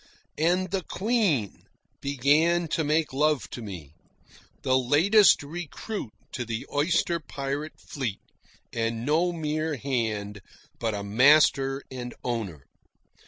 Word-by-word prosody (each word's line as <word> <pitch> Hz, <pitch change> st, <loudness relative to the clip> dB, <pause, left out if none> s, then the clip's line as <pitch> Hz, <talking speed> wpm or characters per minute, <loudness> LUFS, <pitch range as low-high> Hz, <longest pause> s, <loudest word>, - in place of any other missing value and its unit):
And 180 Hz, +3 st, +2 dB
the 195 Hz, -1 st, 0 dB
Queen 190 Hz, -, 0 dB, 0.3 s
began 150 Hz, +5 st, +2 dB
to 160 Hz, -, 0 dB
make 155 Hz, 0 st, +1 dB
love 150 Hz, 0 st, +1 dB
to 120 Hz, -, -6 dB
me, 90 Hz, -9 st, -8 dB, 0.7 s
the 130 Hz, -, +3 dB
latest 160 Hz, -, +5 dB
recruit 170 Hz, -, -6 dB, 0.2 s
to 125 Hz, -, -3 dB
the 115 Hz, -1 st, -4 dB
oyster 170 Hz, +3 st, +1 dB
pirate 145 Hz, 0 st, -5 dB
fleet, 125 Hz, -8 st, -4 dB, 0.5 s
and 115 Hz, 0 st, -2 dB
no 165 Hz, +5 st, +2 dB
mere 155 Hz, -1 st, -2 dB
hand, 110 Hz, -6 st, -2 dB, 0.4 s
but 110 Hz, -2 st, -1 dB
a 100 Hz, -, -4 dB
master 135 Hz, +4 st, +4 dB
and 125 Hz, -2 st, -6 dB
owner. 105 Hz, -, -4 dB
140 Hz, 120 wpm, -27 LUFS, 115-160 Hz, 0.7 s, latest